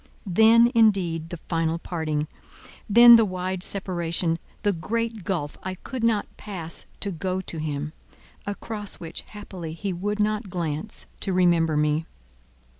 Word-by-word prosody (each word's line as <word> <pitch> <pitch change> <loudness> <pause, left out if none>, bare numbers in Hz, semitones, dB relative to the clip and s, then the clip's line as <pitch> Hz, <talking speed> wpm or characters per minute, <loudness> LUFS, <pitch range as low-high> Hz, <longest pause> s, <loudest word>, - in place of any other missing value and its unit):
Then, 225 +5 +6
indeed, 185 -8 +3
the 175 - -5
final 165 0 -1
parting, 155 -3 -2 0.6
then 235 +2 +10
the 225 - +5
wide 185 -2 -3
separation, 170 -3 -1 0.2
the 205 - +3
great 225 +5 -3
gulf 165 -6 -3
I 185 0 -4
could 245 +6 -6
not 225 -3 +2
pass 175 -6 -3
to 200 - 0
go 185 +2 -2
to 170 -3 -4
him—across 160 +8 -5
which, 165 0 -5
haply, 185 -6 -7
he 190 +3 -3
would 205 +4 -3
not 210 0 0
glance, 170 +2 -4
to 195 - -2
remember 170 -4 +3
me. 150 +1 +1
185 Hz, 135 wpm, -25 LUFS, 165-210 Hz, 0.6 s, then